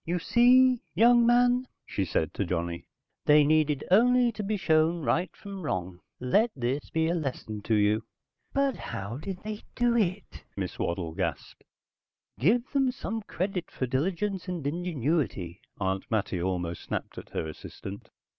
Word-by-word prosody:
"You 175 +2 -1
see, 250 +6 +5
young 235 +4 +6
man," 245 +1 +4 0.2
she 100 - -2
said 80 -2 -1
to - - -1
Johnny. 85 -1 -3 0.4
"They 150 0 +7
needed 150 -1 +2
only 245 +4 +5
to 220 - -6
be 210 +1 -1
shown 160 -2 +2
right 165 +9 +1
from 200 -1 -8
wrong. 90 - -3 0.2
Let 205 - +3
this 130 +2 -2
be 160 0 +1
a 170 - +1
lesson 130 -9 -4
to 110 - +2
you." 105 +1 +2 0.5
"But 275 -1 +1
how 100 +5 -5
did 180 +5 -6
they 215 0 -5
do 240 -1 +2
it?" 185 - -1
Mrs. - - -4
Waddle 85 -2 -2
gasped. - - -4 0.8
"Give 230 - +3
them 270 -2 +2
some 225 -3 -4
credit 185 -1 -3
for 130 - -3
diligence 180 +9 -1
and 175 -5 -4
ingenuity," 145 - -1 0.2
Aunt 95 -1 -2
Mattie 100 -5 -1
almost 90 -2 -2
snapped - - -5
at - - -13
her 80 - -3
assistant. 95 +5 -9
160 Hz, 155 wpm, -28 LUFS, -, 0.8 s, They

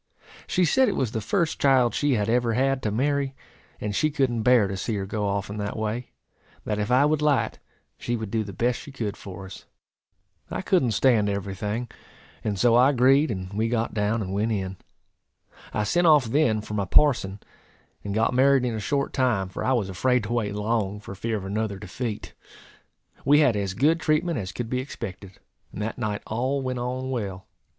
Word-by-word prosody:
She 180 -1 +2
said 260 +9 +4
it - - -2
was 125 -5 -1
the 110 - -2
first 160 - 0
child 130 -4 +4
she 145 -1 +1
had 105 -2 0
ever 120 0 +2
had 135 +2 +1
to 110 - -1
marry; 140 +3 0 0.4
and 105 -1 -3
she 155 - +2
couldn't 135 -6 0
bear 120 -3 +5
to 95 - -4
see 105 +4 -2
her 100 -1 -2
go 105 +1 -2
off 100 0 -1
in 105 - -6
that 105 +1 -3
way; 110 +3 -3 0.6
that 105 -1 -1
if 105 - -1
I 130 +3 +5
would 150 0 +1
light, 140 -7 +1 0.4
she 120 - -2
would 110 -3 -5
do 110 -1 0
the 100 - -7
best 120 +5 0
she 145 - -10
could 110 -7 -4
for 95 0 -9
us. 95 - -11 0.8
I - - -4
couldn't 130 - +2
stand 110 -2 +3
every 100 -1 -3
thing, 105 +5 -3 0.6
and 105 -2 -1
so 120 +3 +4
I 125 +3 +6
agreed, 135 +2 +4
and 95 -3 -5
we 110 +2 0
got 115 -1 -1
down, 105 +1 0
and 95 0 -5
went 105 +3 0
in. 95 -3 -3 0.9
I 105 - -1
sent 175 +10 +2
off 150 -5 +6
then 115 -3 +2
for 105 - -8
my 100 -2 0
parson, 105 -7 +3 0.6
and 100 0 -4
got 110 +2 +2
married 135 0 +4
in 120 - -1
a 110 - -3
short 140 +6 -1
time; 120 -8 +1
for - - -5
I 130 - +2
was 115 -6 0
afraid 125 +6 +1
to 110 +3 -3
wait 105 -4 -1
long, 105 -1 -1
for 105 - -9
fear 110 +3 -2
of 95 - -6
another 100 0 -2
defeat. 105 +3 -5 0.9
We 145 +3 +5
had 130 -7 +4
as 100 -2 -2
good 155 +8 +3
treatment 155 -1 +1
as 95 -2 -5
could 120 +3 -4
be 125 +2 -1
expected; 100 -7 -7 0.4
and - - -8
that 115 +3 -4
night 105 -3 -2
all 130 +5 -1
went 130 -1 -2
on 130 +2 -3
well. 100 -6 -4
115 Hz, 210 wpm, -25 LUFS, 105-130 Hz, 0.9 s, I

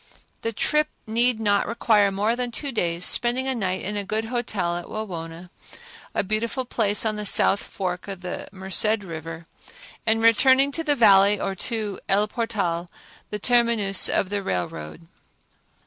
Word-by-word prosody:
The 230 - -2
trip 300 +7 +1 0.2
need 235 +1 +1
not 205 -2 +1
require 215 -3 +2
more 210 +4 0
than 250 0 -2
two 275 +4 -3
days, 175 -6 -1
spending 250 +2 +3
a 265 - 0
night 190 -6 -2
in 210 +2 -4
a 205 - -2
good 215 +3 -2
hotel 220 -7 -2
at 175 0 -6
Wawona, 175 -4 -7 0.6
a - - +1
beautiful 225 +5 -2
place 215 -3 0
on 220 - +1
the 210 0 -5
south 195 - +4
fork 180 -1 -5
of 195 -2 -7
the 180 -1 -6
Merced 200 +2 +2
River, 165 -1 -8 0.6
and 220 0 +2
returning 260 +5 +4
to 325 +3 -3
the 295 -2 +1
Valley 200 -4 +5
or 195 - -2
to 210 0 -3
El 205 +2 +2
Portal, 200 -7 -2 0.4
the 210 - -4
terminus 230 -4 +2
of 185 - 0
the 205 0 -2
railroad. 80 - -5
210 Hz, 165 wpm, -24 LUFS, 185-230 Hz, 0.6 s, Valley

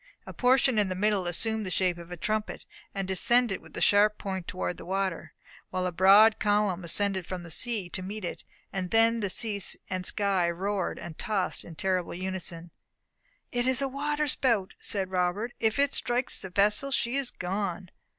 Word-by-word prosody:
A - - -8
portion 250 -2 +3
in 205 -2 +1
the 185 - -2
middle 200 -1 +1
assumed 220 +5 0
the 190 - -4
shape 180 -1 0
of 170 0 -11
a 180 - -7
trumpet, 215 +4 -3 0.3
and 195 -1 -2
descended 220 +3 +3
with - - -17
the - - -5
sharp 210 +1 +4
point 190 -3 -5
toward 185 -1 -3
the - - -9
water; 190 -2 -2 0.4
while 185 0 -2
a 180 - -1
broad 200 +5 +6
column 205 -3 +1
ascended 190 +1 +1
from 185 -2 -5
the 170 - -9
sea 220 -2 -1
to 185 - -4
meet 200 +1 -5
it; - - -6 0.3
and 185 -2 -3
then 225 +1 +3
sea 205 +1 0 0.3
and 185 0 -2
sky 195 -4 +1
roared 190 +2 -2
and 160 -2 -9
tossed 210 -5 -1
in 165 - -11
terrible 185 +1 -1
unison. 175 -2 -5 0.8
"It 245 +1 0
is 260 0 +2
a 275 - +1
water 295 +2 -1
spout!" 230 -8 +1
said 190 -2 -1
Robert, 185 +6 -1
"if 220 +1 +1
it 280 0 +2
strikes 245 +1 -1
the 190 - -5
vessel 210 +8 +2
she 260 -2 0
is 275 -3 0
gone. 185 -1 -4
195 Hz, 190 wpm, -28 LUFS, 185-225 Hz, 0.8 s, broad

